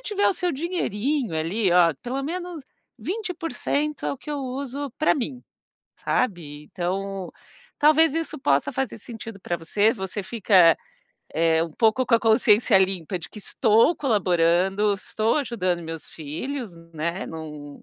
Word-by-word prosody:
tiver 415 -4 0
o - - +4
seu 360 0 -1
dinheirinho, 280 - -1
ali, 180 +5 0
ó, 170 -2 +5
pelo 265 +3 -3
menos 345 0 -5 0.4
20% 330 - -3
é - - 0
o - - -6
que 300 - -9
eu 290 - -2
uso 270 +1 -4
pra 310 - +3
mim, 255 -2 -4 0.5
sabe. 165 -11 -2
Então, 190 +2 -4 0.5
talvez 310 +1 +5
isso 325 -3 -3
possa 140 - +2
fazer 265 -3 -3
sentido 225 -2 -9
pra 175 - -2
você. 205 +7 +2
Você 190 -1 -5
fica, 185 -6 +4 0.6
eh, 165 0 +3
um 165 -2 -5
pouco 225 +5 +2
com 230 - +4
a 230 - +4
consciência 220 -2 +5
limpa 185 -1 0
de 165 - -9
que 210 - -11
estou 225 - +3
colaborando, 190 - +2
estou 215 +4 -1
ajudando 185 - -1
meus 165 -1 -7
filhos, 195 - -6 0.2
né, 170 +4 -3
não 150 -3 -9
215 Hz, 150 wpm, -24 LUFS, 175-275 Hz, 0.6 s, ó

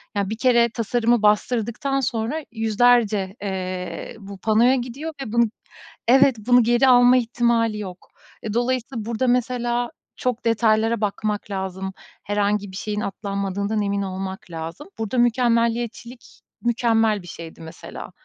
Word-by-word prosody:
ya, 200 -1 0
1 220 - -3
kere 235 -1 +4
tasarımı 235 0 +1
bastırdıktan 235 +5 +1
sonra 260 +4 -2
100'lerce, 220 -3 +2
eee, 185 -3 -4
bu 200 -1 -9
panoya 225 +5 +4
gidiyor 265 +6 -5
ve 225 - -5
bunu, 235 0 +4 0.6
evet, 265 +1 +6
bunu 245 +3 +4
geri 240 +3 +3
alma 245 0 +7
ihtimali 235 -2 +1
yok. 185 -3 -8 0.3
E, 215 - -3
dolayısıyla 240 -1 -1
burada, 235 +3 -1
mesela, 240 -1 0 0.3
çok 250 -2 -2
detaylara 225 0 +2
bakmak 210 0 -2
lazım. 190 0 -4 0.3
Herhangi 205 -1 0
bir - - -10
şeyin 210 0 -3
atlanmadığından 200 +1 -2
emin 200 0 -1
olmak 190 -1 -5
lazım. 165 - -7
Burada 225 +3 -2
mükemmeliyetçilik 235 0 0 0.2
mükemmel 225 -3 +2
bir 175 - -13
şeydi, 165 -1 -9
mesela. 160 0 -9
225 Hz, 130 wpm, -22 LUFS, 200-240 Hz, 0.6 s, alma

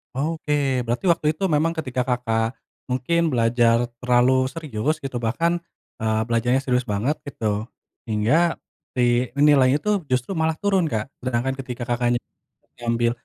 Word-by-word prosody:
Oke, 150 +1 -1 0.3
berarti 120 +11 -2
waktu 165 -2 +2
itu 175 - -7
memang 160 +2 +2
ketika 130 -6 -2
Kakak 115 -2 0 0.3
mungkin 145 +5 0
belajar 115 0 +3
terlalu 125 +1 +3
serius 155 -2 -2
gitu 135 -3 -4
bahkan, 165 +10 0 0.4
eee, 110 0 0
belajarnya 120 +3 +2
serius 125 -2 0
banget 115 +8 -1
gitu, 110 -6 -2 0.4
hingga 120 +11 +2 0.4
si 120 0 +1
nilainya 140 -1 +4
tuh 205 -6 0
justru 130 +7 -1
malah 160 0 +2
turun 195 -4 +2
Kak, 110 -3 -2
sedangkan 130 +1 -1
ketika 125 -2 -6
Kakaknya 120 0 +1 0.6
sambil 115 0 +1
125 Hz, 135 wpm, -23 LUFS, 120-150 Hz, 0.6 s, nilainya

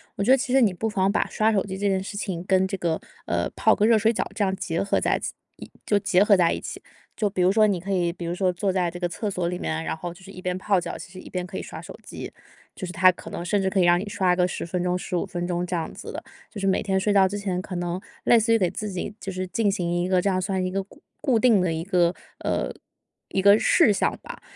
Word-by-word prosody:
我 200 - -1
觉 - - 0
得 265 - +7
其 260 -1 -3
实 270 - +6
你 205 -5 +4
不 220 +5 -2
妨 195 -2 +1
把 - - +1
刷 220 +1 +2
手 195 - +2
机 190 -1 -5
这 200 +1 0
件 190 -1 +1
事 205 - -6
情 180 -4 -3
跟 190 0 +2
这 195 - -3
个， 170 -2 -1 0.3
呃， - - -1
泡 - - +4
个 210 - +2
热 225 0 +5
水 225 +2 +3
澡 - - -1
这 210 - +1
样 190 -1 +1
结 165 -2 -2
合 200 - +1
在 - - +1
自 - - -5 0.2
一 - - -11
就 205 - +3
结 200 -1 +3
合 210 -1 +5
在 175 -3 +3
一 - - -2
起。 - - -7 0.4
就 210 - +1
比 190 -2 -2
如 185 - +5
说 215 0 +5
你 195 -3 0
可 195 +3 -5
以 175 -3 +1
比 175 0 -7
如 170 - -2
说 185 0 +1
坐 190 +2 0
在 180 -2 +1
这 175 +1 -8
个 175 - 0
厕 205 +5 -3
所 180 -3 -2
里 180 +1 -3
面 - - -2
啊， 160 - -2
然 - - -2
后 175 +2 -6
就 175 - -18
是 195 - -11
一 185 - -10
边 180 0 -2
泡 195 0 +2
脚， - - -5
其 - - -10
实 185 - -10
一 - - -11
边 180 -1 -3
可 190 +1 -7
以 - - -3
刷 - - -8
手 - - -10
机， - - -8 0.4
就 185 - -6
是 - - -5
它 185 +1 +6
可 - - -11
能 170 - -5
甚 200 +2 +1
至 190 - +1
可 190 0 0
以 180 - +5
让 175 0 +5
你 205 - -5
刷 185 -2 +2
个 180 0 +2
10 180 - -4
分 175 +1 -2
钟、 180 0 0
15 180 0 -2
分 175 -2 -4
钟 175 0 -1
这 180 - -2
样 165 -2 -3
子 - - -8
的。 - - -6 0.3
就 205 - -8
是 195 - -2
每 190 - +2
天 190 -1 0
睡 205 +2 +1
觉 195 -1 +5
之 205 +2 -4
前 185 -3 -2
可 185 - -7
能 175 +1 -2 0.2
类 235 - +6
似 230 +1 +2
于 - - +5
给 185 -5 +1
自 210 +2 -4
己 185 +2 -4
就 195 - -5
是 185 0 -3
进 205 +4 +1
行 175 -3 -1
一 180 - -1
个 185 -1 +3
这 200 - +1
样 185 -1 0
算 190 -1 -1
一 185 - -2
个 195 +1 -1
固 200 - -20 0.2
固 255 -6 +2
定 220 -5 +4
的 180 -2 +1
一 160 0 -2
个， 180 -2 +2 0.2
呃， - - -1 0.6
一 195 - -1
个 200 +2 +7
事 215 - +5
项 - - 0
吧。 - - -9
190 Hz, 325 characters per minute, -25 LUFS, 180-200 Hz, 0.6 s, 得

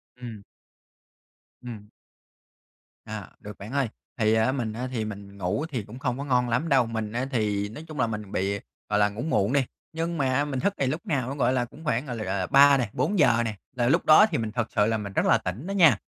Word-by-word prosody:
Ừm. 120 -4 -8 1.2
Ừm. 110 -4 -9 1.2
Ờ, - - -7
được 105 -1 -10
bạn 105 +5 -9
ơi. 140 -3 +1 0.3
Thì 110 -2 +3
á 110 +3 +3
mình 120 -5 -2
á 125 +3 -4
thì 115 -4 -2
mình 100 -1 -8
ngủ 100 - -1
thì 125 -9 -3
cũng 115 +6 -11
không 125 -3 -1
có 140 - -4
ngon 125 -3 +2
lắm 135 +8 0
đâu. 135 -4 +4
Mình 110 -2 -4
á 125 +3 -1
thì 105 -4 0
nói 150 +9 -9
chung 155 -2 -8
là 115 - +3
mình 105 -3 -5
bị, 100 +2 -1 0.3
gọi 105 0 +2
là, 105 0 +4
ngủ 105 +4 -6
muộn 110 -5 +1
đi, 140 - +3 0.3
nhưng 165 +1 -2
mà 135 0 +1
mình 135 -3 -3
thức 200 - +1
thì 135 - +2
lúc 155 +5 -3
nào 130 -5 -1
nó, 135 - -4
gọi 130 -2 +2
là, 125 -1 +1
cũng 150 +6 -14
khoảng, 140 -2 0
gọi 125 -3 -5
là, 110 - -4 0.2
ờ 90 - -1
3 140 0 +7
nè, 120 -5 -1
4 205 -1 0
giờ 120 -5 +5
nè, 110 -2 -3 0.2
là 120 -1 +1
lúc - - +2
đó 155 +7 +8
thì - - +1
mình 110 -2 -3
thật 115 0 -1
sự 105 - +4
là 110 +1 +1
mình 100 -2 -6
rất - - +1
là - - +5
tỉnh 105 - -5
đó 195 - -3
nha. 165 - +6
120 Hz, 250 wpm, -26 LUFS, 105-140 Hz, 1.2 s, đó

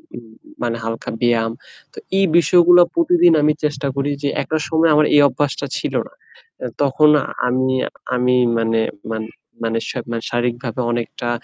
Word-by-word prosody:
উম 120 - -9
উম 110 - -19 0.3
মানে 115 -1 -2
হালকা 115 0 -5
ব্যায়াম। 115 -2 +1 0.4
তো - - -20 0.2
এই 195 - +4
বিষয়গুলো 175 +2 +5
প্রতিদিন 335 - +4
আমি 150 +1 +3
চেষ্টা 145 -2 -2
করি 140 +1 -1
যে 140 - +1
একটা 160 - -2
সময় 160 0 +2
আমার 150 - +4
এই 145 - +7
অভ্যাসটা 140 +1 -2
ছিল - - -4
না। - - -23 0.5
এ - - -3 0.2
তখন 145 +2 +3 0.4
আমি 130 +1 0 0.5
আমি 125 0 +2 0.2
মানে 115 0 0 0.3
মান 110 0 -3 0.4
মানে 115 0 -1
শা - - -4
মানে 115 -1 -4
শারীরিকভাবে 120 0 -2
অনেকটা 120 0 -4
130 Hz, 165 wpm, -19 LUFS, 115-150 Hz, 0.5 s, এই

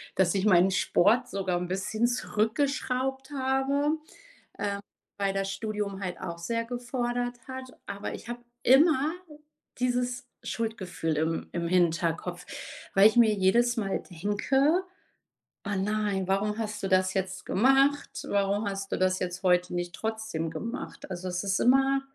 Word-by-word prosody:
dass 180 -2 +3
ich 195 - +1
meinen 190 -2 +5
Sport 205 +6 +3
sogar 190 -2 -1
'n 180 - -3
bisschen 195 +5 0
zurückgeschraubt 265 +3 -1
habe, 270 +2 +1 0.7
ähm, 200 -1 -1 0.4
weil 195 -1 +1
das 195 0 -1
Studium 205 -1 -3
halt 180 -2 -4
auch 170 -2 -5
sehr 230 +7 -2
gefordert 245 0 -2
hat. 260 0 -8
Aber 200 0 -5
ich - - -9
habe 240 0 -5 0.2
immer 295 +2 +5 0.7
dieses 245 0 0 0.2
Schuldgefühl 190 -8 -2
im 160 +1 -1
im 170 -1 -2
Hinterkopf, 175 0 +1 0.5
weil 195 +2 +8
ich 220 - -4
mir 225 -3 +6
jedes 235 +6 +3
Mal 195 -3 -1
denke: 265 - +1 0.8
„Ah, 200 -1 -2
nein, 200 -1 0
warum 205 +2 0
hast 210 -2 -4
du 195 - -1
das 185 0 +3
jetzt 190 -1 -2
gemacht? 270 +5 +2
Warum 200 +1 +1
hast 195 0 -4
du - - 0
das 185 0 +2
jetzt 180 +1 -4
heute 180 -1 +3
nicht 175 +1 -3
trotzdem 220 -8 -3
gemacht?” 230 +4 -6
Also, 185 +1 -4
es 180 +2 -2
ist 195 -1 +1
immer 270 +2 +4
205 Hz, 145 wpm, -28 LUFS, 185-245 Hz, 0.8 s, weil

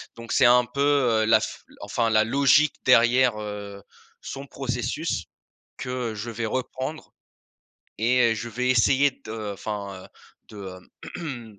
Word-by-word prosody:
Donc 115 -1 -9
c'est - - +4
un 125 0 +6
peu, 130 +4 -4
heu, 130 -6 +3
la 110 - +5
f - - -6 0.2
enfin, 115 +3 -1
la 110 0 +4
logique 140 +5 +3
derrière, 125 -1 +4
heu, 100 -1 -7 0.4
son 135 +1 -7
processus, 125 +4 -3 0.5
que 125 -3 -4
je 105 +3 -5
vais 115 +1 -4
reprendre 130 +6 -4 0.9
et 120 +1 +3
heu, - - -2
je 115 +2 -5
vais 125 +3 -2
essayer 135 +3 +4
de 110 -2 -5
enfin, 100 -2 -6
heu, - - -14 0.4
de 105 - -13 0.6
heu 120 - -7
120 Hz, 145 wpm, -25 LUFS, 110-130 Hz, 0.9 s, un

